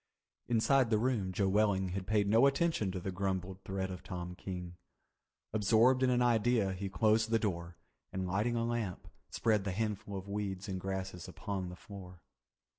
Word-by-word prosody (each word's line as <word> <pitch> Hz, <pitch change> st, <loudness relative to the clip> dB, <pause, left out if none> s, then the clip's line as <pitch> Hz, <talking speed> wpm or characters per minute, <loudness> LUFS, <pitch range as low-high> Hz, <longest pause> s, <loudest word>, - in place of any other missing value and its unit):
Inside 120 Hz, +2 st, +3 dB
the 110 Hz, -, +3 dB
room 110 Hz, -5 st, 0 dB
Joe 95 Hz, +1 st, +1 dB
Welling 95 Hz, -1 st, +2 dB
had 95 Hz, 0 st, -4 dB
paid 105 Hz, -2 st, +2 dB
no 115 Hz, +6 st, +6 dB
attention 140 Hz, -, +1 dB
to 90 Hz, -, -3 dB
the 95 Hz, +2 st, -4 dB
grumbled 95 Hz, 0 st, -2 dB
threat 95 Hz, 0 st, -3 dB
of 90 Hz, -, -7 dB
Tom 90 Hz, 0 st, -5 dB
King. 90 Hz, -1 st, -6 dB, 0.8 s
Absorbed 115 Hz, +4 st, +4 dB
in 130 Hz, -, +4 dB
an 125 Hz, 0 st, +3 dB
idea 115 Hz, -4 st, +3 dB
he 95 Hz, +1 st, -4 dB
closed 110 Hz, +4 st, +3 dB
the 115 Hz, -, +4 dB
door 85 Hz, -5 st, -3 dB, 0.3 s
and, 95 Hz, 0 st, -2 dB
lighting 105 Hz, +6 st, 0 dB
a 115 Hz, 0 st, 0 dB
lamp, 115 Hz, -6 st, -3 dB, 0.2 s
spread 105 Hz, -3 st, +1 dB
the 100 Hz, -, -2 dB
handful 105 Hz, -1 st, -2 dB
of 95 Hz, +1 st, -7 dB
weeds 100 Hz, -2 st, -3 dB
and 95 Hz, -2 st, -3 dB
grasses 95 Hz, -2 st, -4 dB
upon 95 Hz, -3 st, -4 dB
the 90 Hz, -, -8 dB
floor. 90 Hz, -2 st, -11 dB
100 Hz, 180 wpm, -33 LUFS, 95-110 Hz, 0.8 s, no